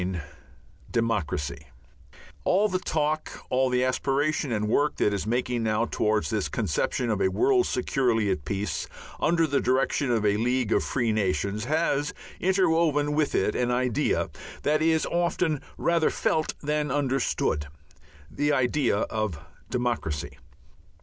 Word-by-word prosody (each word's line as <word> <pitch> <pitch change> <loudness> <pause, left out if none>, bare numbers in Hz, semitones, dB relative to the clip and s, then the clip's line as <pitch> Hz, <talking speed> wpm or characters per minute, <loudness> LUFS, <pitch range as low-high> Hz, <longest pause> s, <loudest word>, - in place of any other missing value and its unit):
IX 90 0 -2 0.7
DEMOCRACY 105 -11 -1 0.8
All 200 +4 +3
the 185 -2 -1
talk, 155 -3 -2
all 130 0 +2
the 125 0 +2
aspiration 135 +2 0
and 105 -2 0
work 145 +7 +2
that 105 - +1
is 100 +1 -2
making 120 +1 0
now 110 +1 +1
towards 110 -1 0
this 110 -3 -1
conception 115 +4 -1
of 105 -2 -1
a - - +4
world 380 - +3
securely 120 -5 +1
at 90 -6 -2
peace, 100 +4 -3 0.3
under 165 0 +3
the 140 -2 +1
direction 130 +2 +1
of 115 -3 +1
a 105 0 +3
League 125 0 0
of - - +2
Free 120 -4 0
Nations, 105 +1 0
has 150 0 0 0.2
interwoven 165 -6 +2
with 150 0 +1
it 95 - +2
an 125 -1 0
idea 125 -1 0 0.3
that 150 +1 +2
is 160 0 +3
often 170 -3 0 0.2
rather 170 -2 +2
felt 155 -1 0
than 150 0 0
understood, 130 - 0 0.6
the 145 +1 0
idea 130 -3 +2
of 110 -7 -2 0.3
Democracy. 120 - -2
125 Hz, 140 wpm, -26 LUFS, 110-150 Hz, 0.8 s, a